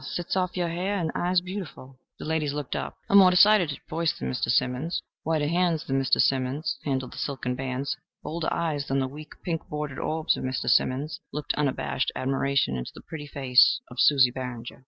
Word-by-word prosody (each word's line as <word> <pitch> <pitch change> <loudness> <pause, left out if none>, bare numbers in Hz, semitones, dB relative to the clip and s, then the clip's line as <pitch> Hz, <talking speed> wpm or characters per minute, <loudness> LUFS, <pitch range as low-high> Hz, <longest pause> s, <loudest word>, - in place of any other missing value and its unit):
Sets 175 +6 -3
off 185 -1 -1
your 175 -1 0
hair 185 +4 -1
and 165 -4 -1
eyes 180 0 +1
beautiful." 180 -8 -8 0.2
The - - -8
ladies 155 -2 0
looked 145 -3 -4
up. - - -4
A - - -3
more 195 -2 +9
decided 180 -5 +5
voice 165 0 -1
than 65 - -3
Mr. - - -1
Simmons'; 130 +7 +1 0.2
whiter 155 -2 0
hands 170 -1 +1
than 135 0 0
Mr. 135 - +2
Simmons' 135 +3 +1
handled 130 -3 -2
the - - -8
silken 130 -3 -2
bands; 130 +1 -3 0.3
bolder 165 0 -3
eyes 150 -4 -1
than 135 - 0
the 135 -1 +1
weak, 150 +3 -10
pink 165 -2 -3
bordered 150 -2 -4
orbs 160 0 0
of - - -6
Mr. 130 0 -2
Simmons 135 +5 +1
looked 150 0 -2
unabashed 135 -2 -1
admiration 135 - 0
into 60 -1 -4
the - - -10
pretty 150 -2 -8
face 135 - +4
of - - -8
Susie 135 -4 +6
Barringer. 125 -2 -6
145 Hz, 195 wpm, -26 LUFS, 130-165 Hz, 0.3 s, more